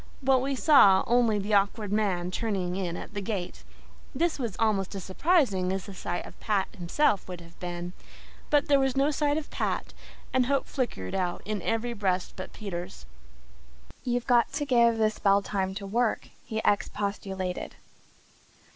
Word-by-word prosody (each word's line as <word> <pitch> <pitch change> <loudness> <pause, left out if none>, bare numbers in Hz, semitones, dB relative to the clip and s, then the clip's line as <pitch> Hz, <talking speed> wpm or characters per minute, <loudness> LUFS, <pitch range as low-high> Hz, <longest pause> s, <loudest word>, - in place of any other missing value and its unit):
But 265 0 +4
we 270 +2 -1
saw 240 -10 +6
only 235 -3 +3
the 205 +1 -2
Awkward 205 +1 +2
Man 185 -4 0
turning 190 -4 -2
in 175 -3 -3
at - - -9
the 205 - -3
gate. 190 -3 -4 0.5
This 325 +2 0
was 230 -7 -3
almost 205 -3 0
as 195 - -5
surprising 195 - +2
as 190 -1 -3
the 200 - -8
sight 175 -1 -4
of - - -13
Pat 205 -3 0
himself 200 - +1
would 180 -2 -6
have 170 0 -15
been; 175 0 -5 0.6
but 290 -1 +3
there 285 -2 +5
was 270 -1 +1
no 280 +2 +3
sign 295 0 +1
of 315 - -5
Pat - - -2 0.4
and 255 -1 +3
hope 275 0 +1
flickered 225 - -3
out 180 -2 -2
in 210 -2 -2
every 225 +5 -1
breast 190 -4 -1
but 185 - -7
Peter's. 175 - -6 1.0
"You've 245 -1 -1
got 240 -3 +3
to 290 - -1
give 235 -4 +4
the 215 -1 +3
spell 200 -1 +2
time 190 -1 -2
to 200 0 -5
work," 225 +3 0 0.2
he 220 - -2
expostulated. 195 -2 -1
205 Hz, 170 wpm, -28 LUFS, 185-245 Hz, 1.0 s, saw